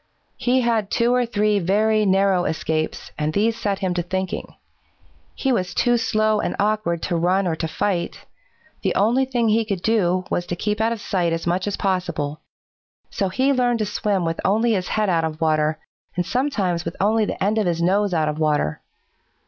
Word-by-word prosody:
"He 255 +1 +2
had 225 -4 0
two 235 +1 +2
or 250 -1 +2
three 210 -2 +1
very 210 +3 +2
narrow 190 -1 +3
escapes, 155 -1 -2
and 150 0 0
these 220 +4 +2
set 205 -4 -1
him 180 - 0
to 175 - -1
thinking. 185 +1 -4 0.8
He 270 - 0
was 185 -7 -1
too 240 -1 +3
slow 215 -3 +1
and - - -2
awkward 205 -5 0
to 175 - -1
run 180 +3 +2
or 170 -3 0
to 160 - -2
fight. 175 +1 -2 0.6
The - - 0
only 240 +6 +3
thing 240 -3 0
he 225 +1 +3
could 200 -5 -4
do 185 -5 +1
was 175 - -1
to 175 - -2
keep 210 +4 -2
out 225 +1 +2
of 230 - -3
sight 175 -5 0
as 165 - -3
much 180 +3 0
as 205 - -2
possible. 180 -6 -2 0.7
So 195 -2 -1
he 265 +8 +2
learned 245 -2 +2
to 215 - -1
swim 200 -3 -1
with 165 0 -2
only 220 +5 +2
his 185 -3 -1
head 215 -1 0
out 170 -3 +2
of 160 -1 -3
water, 155 -1 +1 0.4
and 180 0 -1
sometimes 205 -10 0
with 170 +1 -5
only 215 +3 +2
the 195 - -3
end 210 +3 +2
of 210 - +1
his 170 -1 0
nose 195 +4 +2
out 160 -3 +1
of 150 +1 -2
water. 150 - 0
195 Hz, 200 wpm, -22 LUFS, 175-220 Hz, 0.8 s, narrow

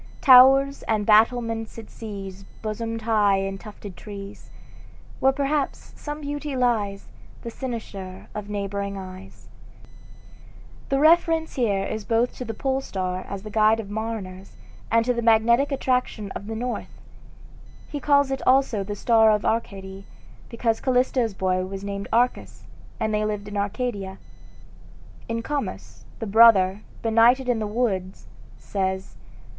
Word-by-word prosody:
Towers 270 +1 +7
and 215 -2 0
battlements 225 +1 +2
it 225 - -10
sees 195 -3 -8 0.2
Bosomed 225 +1 -4
high 210 -3 +3
in 195 0 -3
tufted 205 -3 -10
trees, 200 0 -10 0.7
Where 265 - +4
perhaps 280 +1 -2
some 295 0 -7
beauty 290 0 -4
lies 215 -6 0 0.4
The 235 - -5
Cynosure 210 -7 -7
of 210 -1 -6
neighboring 200 -1 -3
eyes" 185 0 -11 1.4
The 275 - +1
reference 325 +1 +3
here 205 -6 0
is 215 - -4
both 230 +3 +1
to 250 - -5
the 225 - -5
Pole 270 +2 -1
star 185 -5 -3
as 200 -1 -6
the 215 - -8
guide 215 +1 +3
of 205 -2 -7
mariners, 205 -4 -5 0.3
and 230 0 +3
to 250 - +2
the 235 - -2
magnetic 235 +5 +3
attraction 250 -6 -1
of 200 - -7
the 225 - -4
North 245 +2 -5 0.9
He 290 - -5
calls 285 -1 +3
it 270 - -2
also 255 -6 +3
the 205 +1 -5
"Star 225 +1 +4
of 210 -1 +1
Arcady," 195 -3 -3 0.4
because 230 -1 -1
Callisto's 250 -4 +1
boy 185 -1 0
was 195 +1 -7
named 200 0 -5
Arcas, 245 +2 0 0.4
and 220 -2 -1
they 210 0 +1
lived 210 -1 -3
in 205 - -7
Arcadia. 200 -2 -3 1.1
In 230 0 -2
"Comus," 290 +1 -5
the 225 - -5
brother, 205 -3 +5 0.2
benighted 235 +3 +4
in 245 -2 +1
the 215 - -2
woods, 205 -5 -2 0.3
says 190 -1 -3
220 Hz, 140 wpm, -24 LUFS, 200-250 Hz, 1.4 s, Towers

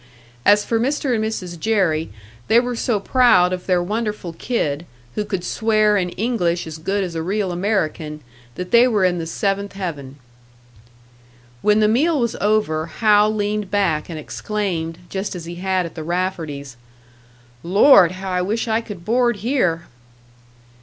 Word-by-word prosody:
As 205 0 +5
for 230 - 0
Mr. 270 +1 0
and 220 -2 0
Mrs. 185 -6 -4
Jerry, 180 -7 +1 0.4
they 230 - +5
were 245 0 -2
so 230 -2 0
proud 200 -6 +4
of 180 0 -5
their 180 -2 +2
wonderful 210 -3 -3
kid, 165 - -2 0.3
who 210 - -1
could 190 -4 -4
swear 215 +1 +2
in 180 -3 0
English 180 -7 0
as 160 -1 -8
good 195 +5 -1
as 180 -2 -5
a 165 - -3
real 190 +2 -1
American, 170 -5 -2 0.3
that 180 0 -6
they 235 +2 +6
were 210 -6 +2
in 180 -1 +1
the 165 - -4
seventh 200 +3 -2
heaven. 150 -9 -6 1.5
When 210 +1 +3
the 210 - +4
meal 290 +8 +2
was 235 -2 0
over, 200 -7 +1
Hal 210 +3 +3
leaned 210 -1 -2
back 180 -7 0
and 165 - -5
exclaimed, 165 -1 -3
just 195 +2 -4
as 170 -2 -7
he 170 +1 -7
had 185 0 0
at 165 - -8
the 160 - -6
Rafferties', 160 -7 -3 0.8
"Lord, 185 - +6
how 190 0 -6
I 180 0 0
wish 215 +6 -1
I 225 0 +1
could 205 -7 -10
board 240 +1 +2
here!" 180 -11 +1
195 Hz, 165 wpm, -20 LUFS, 170-215 Hz, 1.5 s, they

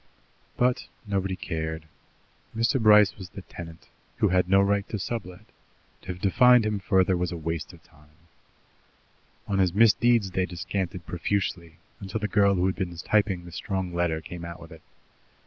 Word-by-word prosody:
But 125 0 +1 0.2
nobody 95 -2 -1
cared. 80 -3 -4 0.7
Mr. 115 +3 +1
Bryce 105 -2 +6
was 95 -2 -8
the 100 0 -10
tenant, 85 -2 -11 0.3
who - - +2
had 90 0 +2
no 95 +1 +5
right 100 +1 +1
to 110 - -3
sublet; 95 -3 -6 0.6
to - - -18
have 90 0 -5
defined 125 +4 +5
him 105 -1 -1
further 95 -1 +2
was 90 0 -2
a 85 - -4
waste 80 -1 -4
of - - -17
time. 75 +1 -24 1.3
On 100 -1 0
his 95 -1 +2
misdeeds 115 -1 +4
they 90 0 0
descanted 90 -1 -4
profusely, 85 -2 -2 0.2
until 100 +2 -4
the 105 - -2
girl 100 -1 +3
who 90 0 +1
had 95 - +1
been 90 -3 -4
typing 95 0 0
the 85 - -10
strong 95 +2 -4
letter 85 -2 0
came 85 +2 -9
out 85 0 -7
with 85 - -13
it. 80 - -13
Mr. - - -37
95 Hz, 175 wpm, -26 LUFS, 85-100 Hz, 1.3 s, Bryce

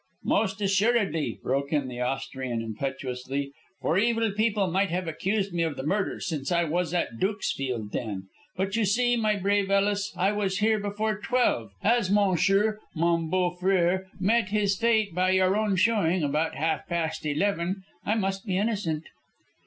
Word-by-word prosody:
"Most 205 -1 +1
assuredly," 200 -4 +1
broke 140 +2 -1
in 145 -4 +1
the 125 -1 -6
Austrian, 130 -1 -2
impetuously, 135 +3 -4 0.3
"for 170 - +2
evil 230 0 +2
people 210 -1 +1
might 190 +2 +1
have 180 +1 -2
accused 195 +4 -1
me 170 - 0
of 160 -3 0
the 130 - -4
murder, 195 +5 -1
since 150 -4 -3
I 170 0 +3
was 170 +2 -1
at 170 -10 -2
Dukesfield 135 - -2
then. 100 -5 -3 0.3
But 195 +2 -1
you 225 - +2
see, 240 +5 +2
my 215 -2 +1
brave 200 0 +1
Ellis, 200 +1 +1
I 190 +3 +2
was 200 -2 -1
here 215 +1 +2
before 205 +1 -2
twelve. 240 - +1
As 230 -4 +3
monsieur, 200 +2 +3 0.2
mon 170 0 +1
beau 180 0 +1
frère, 185 0 +2
met 205 +2 +2
his 205 -1 +1
fate 220 -3 +2
by 185 +1 +2
your 190 +1 +3
own 210 -2 +1
showing 185 -4 +2
about 150 +3 0
half 155 -2 -1
past 160 -2 -2
eleven, 180 +4 -1 0.2
I 215 - +1
must 195 -2 -1
be 185 -1 0
innocent." 195 -7 -1
190 Hz, 165 wpm, -27 LUFS, 160-205 Hz, 0.3 s, I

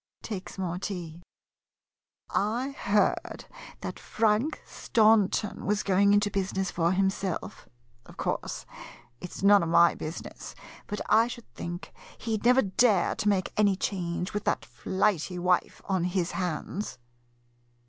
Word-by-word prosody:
[Takes 200 -4 -6
more 180 -2 -2
tea.] 175 -4 -5 1.1
I 235 +7 0
heard 210 -6 +2
that - - -10 0.4
that - - -5
Frank 225 +7 +1
Staunton 215 -2 +2
was 210 +1 0
going 200 +1 +4
into 205 0 +3
business 195 -1 -1
for 170 0 +1
himself. 190 -1 -2 0.4
Of - - -15
course, - - -3 0.5
it 180 - -8
's - - -8
none 200 0 +7
of 170 - -1
my 170 +1 +6
business, 155 +2 -7 0.3
but 210 - -4
I 225 +1 +5
should 235 -1 -8
think 175 +1 -6 0.2
he 225 -1 -2
'd 215 - -5
never 250 +2 +6
dare 200 0 +3
to 210 - 0
make 190 -2 0
any 205 -2 +3
change, 180 -2 -3
with 210 0 -2
that - - 0
flighty 185 -2 -1
wife 180 0 0
on 185 -3 0
his 180 -1 -1
hands. 180 +2 -3
195 Hz, 140 wpm, -28 LUFS, 180-210 Hz, 1.1 s, none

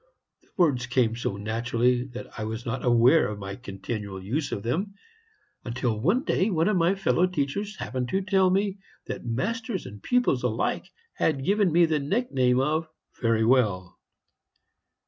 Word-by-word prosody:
The - - -31
words 140 -9 +2
came 120 -3 +1
so 110 -4 -3
naturally 120 +3 0
that 125 -2 -8
I - - -2
was 110 +2 -5
not 125 +2 -3
aware 120 +5 +5
of 105 - -5
my 100 -1 -6
continual 100 -3 -6
use 130 +11 -3
of 100 - -4
them, 190 - -2 0.7
until 120 -3 -2
one 200 - +2
day 200 -8 +1
one 165 -4 +1
of 210 - +2
my 175 +2 +3
fellow 190 -2 +2
teachers 180 +6 -2
happened 125 -1 -3
to 190 +6 0
tell 190 -1 +3
me 195 +1 0 0.3
that - - -6
masters 215 - -2
and 100 0 -10
pupils 245 - +1
alike 115 -3 -1 0.3
had 135 -4 0
given 200 -1 +3
me 170 +2 +5
the 160 -2 0
nickname 140 - +1
of 155 +4 0 0.3
'Very 115 -2 +2
well.' 105 -8 +1
130 Hz, 165 wpm, -26 LUFS, 115-185 Hz, 0.7 s, aware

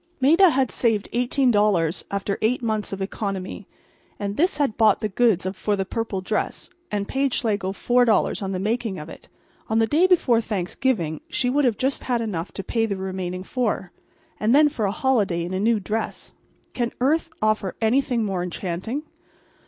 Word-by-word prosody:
Maida 330 +8 +6
had 265 -5 +1
saved 225 -4 0
$18 210 - +2
after 200 0 -2
eight 240 +3 +1
months 215 -2 -1
of 195 -1 -3
economy; 195 -1 -4 0.5
and 200 0 -3
this 340 - +2
had 280 -7 +1
bought 215 -3 +4
the 215 - -2
goods 210 -3 +2
for 205 +1 -1
the 195 -1 -2
purple 220 -2 -3
dress 210 +3 -3 0.2
and 200 -1 -2
paid 270 -1 0
Schlegel 200 -5 -1
$4 240 +2 +2
on 195 -1 -3
the 190 - -2
making 215 +1 -1
of 150 +2 -8
it. - - -12 0.4
On 220 - +1
the 225 - +4
day 315 +10 +3
before 260 -11 +3
Thanksgiving 185 - -1
she 250 -1 0
would 285 +1 +2
have 230 -5 +2
just 265 0 -2
enough 215 -8 -1
to 195 - -5
pay 225 +1 0
the 200 -2 -2
remaining 185 -1 -4
$4. 215 -5 -2 0.5
And 220 +4 +3
then 295 +1 +6
for 235 -8 -2
a 195 - +1
holiday 205 -9 +1
in 180 - -5
a 185 - -1
new 220 +2 +2
dress—can 225 +3 -5
earth 310 +6 +2
offer 215 -3 0
anything 240 +1 +2
more 190 -3 -1
enchanting? 185 - -4
215 Hz, 175 wpm, -23 LUFS, 195-250 Hz, 0.5 s, Maida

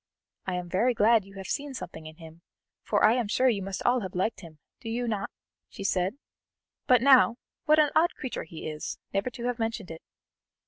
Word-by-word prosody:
"I 185 - -1
am 180 -1 -4
very 225 +8 +1
glad 220 -1 +4
you 195 0 -15
have 195 -1 -7
seen 285 +5 -3
something 160 -10 -8
in 155 - -11
him, 160 0 -13 0.4
for - - +2
I 215 - +6
am 245 -3 0
sure 255 +5 +3
you 210 -5 0
must 195 0 -5
all 250 +1 +3
have 190 -3 -6
liked 205 +5 -1
him, 165 -4 -13 0.2
do 225 - -7
you 240 +1 -2
not?" 205 -3 -2 0.4
she - - -8
said. 190 +4 0 0.7
"But, 250 -1 +5
now, 260 -4 +6 0.3
what 305 0 +5
an 300 -2 +4
odd 335 +2 +3
creature 260 - -5
he 160 0 -8
is, 155 -1 -5 0.2
never 195 +5 0
to 235 -1 -9
have 245 -1 -2
mentioned 225 -5 -3
it. 165 - -9
215 Hz, 215 wpm, -28 LUFS, 185-245 Hz, 0.7 s, I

